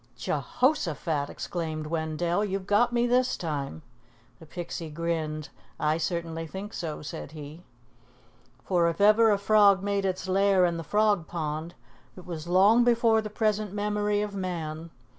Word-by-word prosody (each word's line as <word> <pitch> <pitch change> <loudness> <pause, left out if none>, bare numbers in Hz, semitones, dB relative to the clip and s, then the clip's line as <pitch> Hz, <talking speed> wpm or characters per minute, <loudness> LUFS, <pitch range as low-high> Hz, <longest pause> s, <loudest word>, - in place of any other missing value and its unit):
"Je - - -4
hoshaphat!" 170 - 0
exclaimed 160 -3 -4
Wendell. 165 +4 -1
"You've 195 -2 -3
got 210 +5 +3
me 240 0 +2
this 250 +1 +2
time." 140 - -4 0.6
The 160 - -14
Pixie 170 -1 -6
grinned. 155 -1 -3 0.3
"I 155 +1 +1
certainly 165 -1 -3
think 195 +5 -7
so," 155 -3 -5
said 145 - -7
he. 150 +2 -9 1.0
For 175 -2 +2
if 170 - -5
ever 215 +2 +6
a 205 - +3
frog 200 -1 +4
made 200 -1 0
its 190 0 -2
lair 195 -1 +3
in 170 -1 0
the 165 - -5
Frog 205 -1 +1
Pond, 160 0 -4 0.4
it 180 - -11
was 170 -2 -6
long 200 +7 +5
before 230 -2 +3
the 215 - -6
present 210 -2 -1
memory 210 0 0
of 210 -1 -5
man. 170 -4 -4
180 Hz, 155 wpm, -27 LUFS, 160-210 Hz, 1.0 s, ever